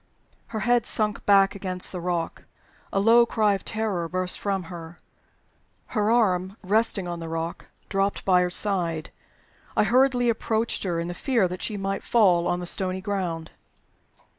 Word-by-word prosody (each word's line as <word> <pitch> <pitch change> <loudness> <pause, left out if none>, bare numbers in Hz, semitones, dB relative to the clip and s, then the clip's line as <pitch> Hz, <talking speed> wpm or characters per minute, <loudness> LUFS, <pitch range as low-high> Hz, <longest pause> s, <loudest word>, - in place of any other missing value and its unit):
Her 220 -2 -4
head 240 +2 +2
sunk 210 -1 +1
back 195 -1 +5
against 185 -2 -3
the 180 - -5
rock. 175 -1 -3 0.5
A 195 - +1
low 230 +4 +6
cry 215 -3 +2
of 195 - -4
terror 205 -7 -2
burst 185 0 -1
from 195 -2 -1
her. 170 0 -9 1.0
Her 210 -2 +1
arm, 195 -4 +2
resting 205 -1 +1
on 175 -1 -4
the 165 -1 -6
rock, 165 +1 -4 0.2
dropped 195 0 -1
at 185 - +5
her 180 - +1
side. 175 -5 -1 0.7
I - - +5
hurriedly 245 +2 +3
approached 225 0 0
her, 175 -3 -1
in 170 - -3
the 175 - -4
fear 235 -1 +1
that 180 +1 -6
she 210 - -3
might 195 0 -2
fall 180 -7 +3
on 175 - 0
the 180 - -5
stony 185 +1 -2
ground. 185 -5 -3
195 Hz, 165 wpm, -25 LUFS, 175-215 Hz, 1.0 s, low